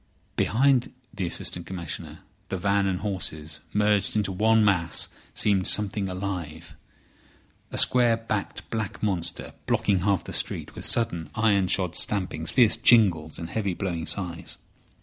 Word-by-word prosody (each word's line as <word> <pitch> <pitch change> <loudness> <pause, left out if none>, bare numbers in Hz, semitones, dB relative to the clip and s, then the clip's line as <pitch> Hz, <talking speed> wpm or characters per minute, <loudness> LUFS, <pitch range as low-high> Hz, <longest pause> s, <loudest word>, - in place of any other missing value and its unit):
Behind 130 +2 +2 0.2
the 95 -4 -3
Assistant 85 0 -3
Commissioner 90 -3 -7 0.3
the 95 - -2
van 100 +2 +1
and 95 -1 -2
horses, 80 -6 -4
merged 105 -1 +1
into 105 -2 0
one 110 +3 +3
mass, 90 -5 +1 0.3
seemed 95 -3 +2
something 100 -1 +1
alive—a 85 -5 -9
square 120 -2 +5
backed 110 -3 -4
black 110 -3 -4
monster 95 -5 -2
blocking 100 -3 +1
half 100 0 0
the - - -8
street, - - -1
with - - -6
sudden 85 -10 +1
iron 100 -4 +2
shod 90 -2 0
stampings, 90 -5 +1
fierce 120 -4 +4
jingles, 95 -10 +4
and 85 0 -7
heavy, 100 -4 -2
blowing 85 -3 -4
sighs. 85 -5 -3
95 Hz, 135 wpm, -25 LUFS, 85-105 Hz, 0.3 s, square